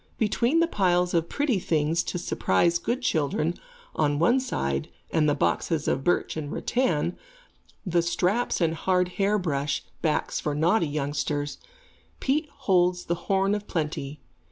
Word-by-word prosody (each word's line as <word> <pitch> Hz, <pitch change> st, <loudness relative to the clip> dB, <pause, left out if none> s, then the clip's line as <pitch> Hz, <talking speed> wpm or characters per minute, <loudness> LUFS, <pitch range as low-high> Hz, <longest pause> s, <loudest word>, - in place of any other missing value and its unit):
Between 235 Hz, +8 st, +2 dB
the 335 Hz, -, +3 dB
piles 180 Hz, -, +1 dB
of 170 Hz, -1 st, +1 dB
pretty 285 Hz, -8 st, 0 dB
things 160 Hz, 0 st, +1 dB
to -, -, -3 dB
surprise 170 Hz, -, +1 dB
good 240 Hz, +8 st, -2 dB
children, 155 Hz, -, +1 dB, 0.4 s
on 145 Hz, -1 st, +1 dB
one 210 Hz, -, +4 dB
side, 70 Hz, -, -2 dB, 0.2 s
and 155 Hz, -2 st, +3 dB
the 145 Hz, -, +2 dB
boxes 155 Hz, +2 st, 0 dB
of 135 Hz, -, 0 dB
birch 175 Hz, -, +1 dB
and 155 Hz, -2 st, -4 dB
rattan, 175 Hz, -, 0 dB, 0.7 s
the 175 Hz, -2 st, +2 dB
straps 180 Hz, +7 st, 0 dB
and 165 Hz, -1 st, +2 dB
hard 180 Hz, +2 st, +1 dB
hair 200 Hz, +3 st, +1 dB
brush 145 Hz, -6 st, -1 dB, 0.2 s
backs 155 Hz, -2 st, 0 dB
for 150 Hz, -1 st, -2 dB
naughty 165 Hz, +4 st, +2 dB
youngsters, 145 Hz, 0 st, -2 dB, 0.6 s
Pete 295 Hz, +3 st, 0 dB
holds 180 Hz, -8 st, +1 dB
the 170 Hz, -, 0 dB, 0.2 s
horn 195 Hz, 0 st, +3 dB
of 210 Hz, 0 st, -3 dB
plenty. 150 Hz, -3 st, -3 dB
170 Hz, 150 wpm, -26 LUFS, 150-200 Hz, 0.7 s, one